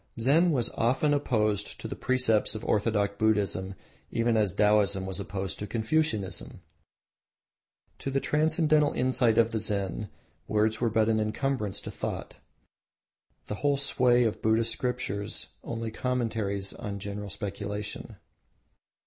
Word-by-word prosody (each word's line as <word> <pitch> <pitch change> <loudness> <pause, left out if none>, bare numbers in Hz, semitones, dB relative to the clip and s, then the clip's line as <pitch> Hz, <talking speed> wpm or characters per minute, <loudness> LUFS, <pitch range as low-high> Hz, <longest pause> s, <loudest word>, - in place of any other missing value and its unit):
Zen 150 +9 +4
was 125 -6 +1
often 130 +6 +1
opposed 105 -7 0
to - - -5
the - - -5
precepts 120 -5 +2
of 110 - -6
orthodox 105 -1 +1
Buddhism 100 -3 +1 0.3
even 115 0 +1
as 105 -3 +2
Taoism 105 -1 +3
was 95 +1 -4
opposed 95 -2 -4
to 105 - -4
Confucianism. 110 - -1 1.4
To - - -3
the 135 0 +1
transcendental 155 0 +2
insight 125 -3 +2
of 115 0 +4
the 110 - -1
Zen, 100 -1 -1 0.4
words 110 +1 +1
were 120 - +3
but 110 0 +2
an 110 -1 +2
incumbrance 110 0 -1
to - - -7
thought; - - -5 1.1
the 105 - -5
whole 145 -1 +2
sway 125 -3 +3
of 110 -3 -1
Buddhist 110 +1 +2
scriptures 105 -9 -3
only 115 -1 -4
commentaries 110 -5 -2
on 105 -4 -5
personal 100 +1 -5
speculation. 105 +3 -5
110 Hz, 130 wpm, -28 LUFS, 100-125 Hz, 1.4 s, Zen